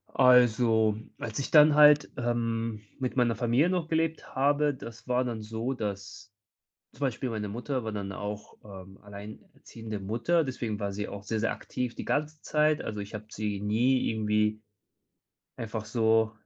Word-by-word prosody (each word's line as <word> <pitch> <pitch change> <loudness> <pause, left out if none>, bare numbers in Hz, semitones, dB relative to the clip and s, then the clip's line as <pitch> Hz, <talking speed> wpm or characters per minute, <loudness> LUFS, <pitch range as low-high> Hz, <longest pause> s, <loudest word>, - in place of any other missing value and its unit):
Also, 115 -3 +5 0.2
als 110 -2 -5
ich 140 - -3
dann 150 -1 +7
halt, 150 -1 +6
ähm, 115 -2 -1 0.2
mit 130 -1 -3
meiner 120 -2 +2
Familie 125 +7 +2
noch 180 -3 -1
gelebt 160 0 -1
habe, 145 +2 +2
das 115 -2 -11
war 125 0 +1
dann 115 -3 -4
so, 115 +4 -3
dass 100 -1 -6 0.6
zum 125 - -20
Beispiel 130 -2 -1
meine 105 -2 -3
Mutter 125 +5 -3
war 110 - -3
dann 100 -2 -4
auch, 105 +1 -6
ähm, 95 -2 -11
alleinerziehende 105 +1 -9
Mutter. 120 - +1
Deswegen 115 -5 -3
war 100 -1 -2
sie 105 +1 -4
auch 100 -1 -7
sehr, 110 +1 -2
sehr 115 - +1
aktiv 125 -2 -4
die - - -6
ganze 150 +1 -1
Zeit. 150 0 +2
Also, 105 -1 -4
ich 100 +2 -8
habe 105 - -6
sie 105 -2 -3
nie 120 +6 +2
irgendwie 105 -1 0 1.0
einfach 110 -1 -5
so 110 0 +2
115 Hz, 165 wpm, -28 LUFS, 105-130 Hz, 1.0 s, dann